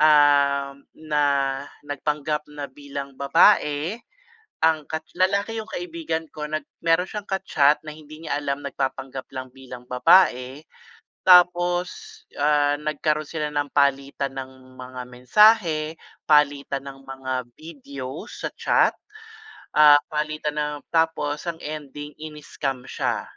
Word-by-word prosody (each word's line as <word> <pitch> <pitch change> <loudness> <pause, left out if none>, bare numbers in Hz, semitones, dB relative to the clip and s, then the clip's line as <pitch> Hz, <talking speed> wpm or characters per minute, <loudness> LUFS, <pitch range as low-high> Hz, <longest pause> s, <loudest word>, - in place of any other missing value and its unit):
ah, 145 -2 +4 0.2
na 150 -2 -1 0.6
nagpanggap 150 +1 -2
na 150 -1 -7
bilang 140 0 -7
babae 145 - +3 0.6
ang 160 -2 +2
kat 160 0 -4
lalaki 200 +5 0
yung 220 - -10
kaibigan 165 -3 -4
ko 150 0 -5
nag 155 0 -3 0.2
meron 165 +1 +3
siyang 210 0 -7
ka-chat 155 -7 +3
na 155 - -7
hindi 155 +1 -13
niya 145 -1 -2
alam 145 0 -3
nagpapanggap 135 -1 -4
lang 130 -2 -8
bilang 130 -2 -11
babae. 125 +1 +3 0.6
Tapos, 180 0 +5 0.5
ah, 145 0 +2
nagkaroon 150 +1 -1
sila 155 -2 -3
ng 145 -1 -3
palitan 140 -1 0
ng 130 -1 -9
mga 130 0 -8
mensahe, 160 - +3 0.3
palitan 145 -2 +2
ng 135 0 -9
mga 135 -1 -5 0.2
videos 140 -3 -9
sa - - -2
chat, - - +2 0.8
ah, 150 -1 +8 0.2
palitan 150 0 -2
ng 150 0 -1 0.2
tapos 160 -2 0
ang 170 - -2
ending 150 -1 -7
iniscam 150 -4 -5
siya - - -2
150 Hz, 120 wpm, -24 LUFS, 140-160 Hz, 0.8 s, ah